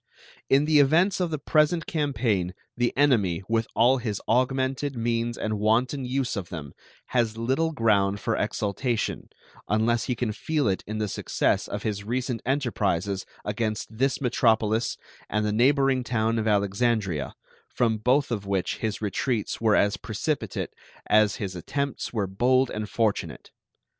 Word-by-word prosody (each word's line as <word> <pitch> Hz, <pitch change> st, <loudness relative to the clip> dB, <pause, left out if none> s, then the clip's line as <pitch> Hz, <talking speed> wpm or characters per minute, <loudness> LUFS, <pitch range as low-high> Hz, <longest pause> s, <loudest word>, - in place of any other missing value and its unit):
In 140 Hz, +2 st, +4 dB
the 155 Hz, -1 st, +4 dB
events 170 Hz, +8 st, +4 dB
of 180 Hz, -2 st, 0 dB
the 155 Hz, -, -2 dB
present 155 Hz, +3 st, +2 dB
campaign 115 Hz, -, -1 dB, 0.2 s
the 120 Hz, 0 st, +1 dB
enemy, 105 Hz, -11 st, +3 dB
with 115 Hz, 0 st, 0 dB
all 125 Hz, +3 st, +4 dB
his 110 Hz, -4 st, -3 dB
augmented 130 Hz, +3 st, +1 dB
means 115 Hz, 0 st, -1 dB
and 110 Hz, -1 st, -2 dB
wanton 125 Hz, +6 st, +1 dB
use 130 Hz, 0 st, -1 dB
of 95 Hz, -5 st, -5 dB
them, 75 Hz, -5 st, -7 dB, 0.4 s
has 115 Hz, -3 st, 0 dB
little 130 Hz, +8 st, 0 dB
ground 100 Hz, -7 st, +2 dB
for -, -, -1 dB
exultation, 110 Hz, +3 st, -2 dB, 0.4 s
unless 110 Hz, +2 st, +1 dB
he 125 Hz, -, -1 dB
can 115 Hz, -1 st, -1 dB
feel 150 Hz, +4 st, -1 dB
it 95 Hz, -2 st, 0 dB
in 110 Hz, +1 st, -4 dB
the 110 Hz, -1 st, -1 dB
success -, -, 0 dB
of -, -, -5 dB
his 105 Hz, -2 st, -2 dB
recent 125 Hz, +2 st, -2 dB
enterprises 100 Hz, -, -1 dB, 0.2 s
against 110 Hz, +1 st, -3 dB
this 135 Hz, +4 st, +1 dB
metropolis 115 Hz, -3 st, +1 dB, 0.3 s
and 105 Hz, +1 st, 0 dB
the 105 Hz, -, 0 dB
neighboring 135 Hz, +2 st, +3 dB
town 115 Hz, -1 st, 0 dB
of 110 Hz, -, -1 dB
Alexandria, 100 Hz, -, 0 dB, 0.3 s
from 115 Hz, -3 st, 0 dB
both 130 Hz, +5 st, +2 dB
of 100 Hz, -4 st, -3 dB
which 95 Hz, -2 st, -1 dB
his 110 Hz, -1 st, -3 dB
retreats 110 Hz, +3 st, -1 dB
were 110 Hz, -2 st, +4 dB
as 100 Hz, +1 st, +2 dB
precipitate 140 Hz, +10 st, -3 dB, 0.3 s
as 105 Hz, -1 st, +4 dB
his 95 Hz, -3 st, -5 dB
attempts 140 Hz, -, -3 dB
were 105 Hz, -4 st, -1 dB
bold 125 Hz, +7 st, +2 dB
and 105 Hz, -1 st, -4 dB
fortunate. 110 Hz, 0 st, -1 dB
115 Hz, 155 wpm, -26 LUFS, 105-130 Hz, 0.4 s, In